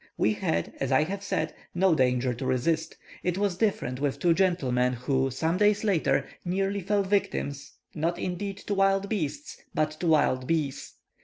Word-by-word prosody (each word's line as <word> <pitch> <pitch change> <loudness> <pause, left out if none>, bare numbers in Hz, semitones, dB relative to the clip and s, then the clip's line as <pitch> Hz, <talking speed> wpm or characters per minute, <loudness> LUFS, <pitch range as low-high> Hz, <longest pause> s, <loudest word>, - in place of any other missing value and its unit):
We 110 - +3
had, 85 -5 -1
as 135 0 -1
I 135 +3 +5
have 195 +5 -4
said, 200 - -1 0.2
no 185 0 +4
danger 125 -3 +2
to 120 - -6
resist; 145 +6 0 0.2
it 180 0 -1
was 200 -2 0
different 180 - -1
with 140 -1 -1
two 170 +3 +3
gentlemen 130 -9 +1
who, 130 +2 0
some 160 +7 -1
days 210 +1 +3
later, 160 -10 +2 0.2
nearly 195 +2 -1
fell 200 +2 +1
victims, 190 -8 -1 0.2
not 165 +2 -1
indeed 190 +2 -3
to 205 - -1
wild 195 0 +2
beasts, 150 -8 -3 0.2
but 155 0 +1
to 175 - -1
wild 135 -5 +3
bees. 155 -5 -2
165 Hz, 170 wpm, -27 LUFS, 135-195 Hz, 0.2 s, I